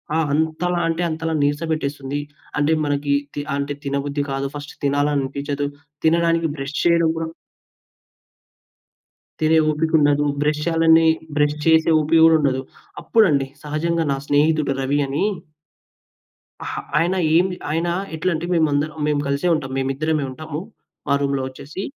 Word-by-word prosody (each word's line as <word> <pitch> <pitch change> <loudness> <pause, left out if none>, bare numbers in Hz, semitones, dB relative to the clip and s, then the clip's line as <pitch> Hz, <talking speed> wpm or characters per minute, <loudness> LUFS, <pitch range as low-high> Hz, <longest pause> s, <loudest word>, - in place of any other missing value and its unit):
ఆ! - - +2
అంతలా 160 +3 0
అంటే 165 +1 -1
అంతలా, 160 0 -2
నీరసపెట్టేస్తుంది. 145 -2 -2 0.4
అంటే, 145 +2 +2
మనకి 145 0 0 0.2
తి 145 - -3
అంటే 140 0 -2
తినబుద్ధి 140 +1 -1
కాదు. 135 0 -2
ఫస్ట్ 145 0 -7
తినాలనిపిచదు. 145 0 0 0.4
తినడానికి 165 0 +3
బ్రష్ 135 +2 -5
చేయడం 170 -1 +4
కూడా 165 0 -2 2.1
తినే 160 +1 +3
ఓపికుండదు. 150 -2 +2 0.2
బ్రష్ 150 0 +1
చేయాలనే 165 -1 +4 0.3
బ్రష్ 150 0 +2
చేసే 160 0 +4
ఓపిక 155 +2 +3
కూడా 165 0 +6
ఉండదు. 135 -3 +1 0.4
అప్పుడండి! 155 -12 +3 0.2
సహజంగా 160 +2 -1
నా 135 - 0
స్నేహితుడు 150 0 +2
రవి 140 +2 0
అని. 135 +2 -1 1.4
అహా! - - -4 0.2
ఆయన 170 +4 +2 0.2
ఏమి 180 +2 +3 0.2
ఆయన 165 +2 0 0.3
ఎట్లంటే, 165 0 -1
మేమందరం 155 -1 +1
మేం 150 -1 +1
కలిసే 140 +5 0
ఉంటాం. 135 -4 -4
మేమిద్దరమే 140 +3 -1
ఉంటాము, 155 +2 -6 0.5
మా - - +4
రూమ్‌లో 140 -1 0
వచ్చేసి. 140 +7 -8
150 Hz, 125 wpm, -21 LUFS, 140-160 Hz, 2.1 s, కూడా